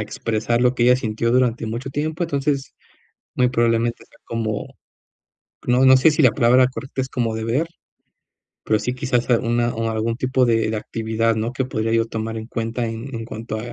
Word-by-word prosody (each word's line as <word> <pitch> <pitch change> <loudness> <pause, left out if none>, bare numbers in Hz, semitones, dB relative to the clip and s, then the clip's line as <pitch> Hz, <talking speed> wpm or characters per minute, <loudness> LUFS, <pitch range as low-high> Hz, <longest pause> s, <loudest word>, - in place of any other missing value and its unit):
expresar 115 +3 -1
lo 125 +1 +3
que 120 - +1
ella 125 +1 +6
sintió 115 -1 -1
durante 120 -2 +1
mucho 120 +5 -4
tiempo. 155 +4 -2
Entonces, 140 -3 -1 0.6
muy 125 0 +3
probablemente 115 -1 +1
sea - - -24
como, 110 -3 -4 0.9
no 125 +2 +4
no 130 0 +8
sé, 130 +5 +5
si 150 - 0
la 130 -5 +6
palabra 125 0 +4
correcta 130 +1 -5
es 130 - -2
como 115 -4 -1
deber. 115 +9 -1 1.0
Pero, 110 - +3
sí, 125 +4 -2
quizás 125 -2 -1
una 120 0 0
o 115 0 -2
algún 110 +1 -1
tipo 130 0 +1
de 115 -2 +2
de 110 - -2
actividad, 110 +1 -1
¿no?, 115 +3 -2
que 130 - -1
podría 115 -3 -2
yo 115 0 +3
tomar 115 0 -4
en 110 +1 -7
cuenta 115 0 -3
en 115 +4 -6
en 115 - -4
cuanto, 110 -1 -6
120 Hz, 190 wpm, -21 LUFS, 115-130 Hz, 1.0 s, no